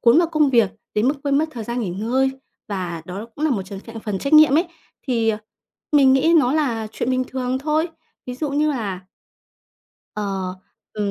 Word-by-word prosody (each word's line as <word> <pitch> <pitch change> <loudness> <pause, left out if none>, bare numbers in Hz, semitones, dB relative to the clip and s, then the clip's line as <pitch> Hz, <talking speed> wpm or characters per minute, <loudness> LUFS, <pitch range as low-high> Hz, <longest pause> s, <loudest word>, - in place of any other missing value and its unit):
cuốn 240 +5 +6
vào 345 - +4
công 305 -3 +3
việc 230 -6 +4 0.2
đến 215 +4 +2
mức 280 - +2
quên 280 0 +2
mất 315 - +2
thời 235 -6 -6
gian 240 +2 -3
nghỉ 200 - -2
ngơi 240 +8 +1 0.4
và 180 -5 -4
đó 195 +6 -6
cũng 300 - -2
là 310 - +2
một 205 -7 0
trong 195 0 -8
trạng 230 0 -9
phần 210 -3 -3
trách 275 - -3
nhiệm 305 -2 +7
ấy. 335 - +2 0.4
Thì, 230 -3 +1
ờ, 215 -1 +1 0.5
mình 275 -3 +6
nghĩ 295 +5 +4
nó 255 -2 +2
là 240 -8 0
chuyện 240 - -2
bình 255 0 +1
thường 260 0 -2
thôi. 310 +4 +1 0.4
Ví 250 - -4
dụ 295 +2 -2
như 300 +2 +2
là 205 -9 -3 1.1
Ờ, 195 -3 -3 0.4
ừm, 210 -1 -2
245 Hz, 210 wpm, -21 LUFS, 210-285 Hz, 1.1 s, nhiệm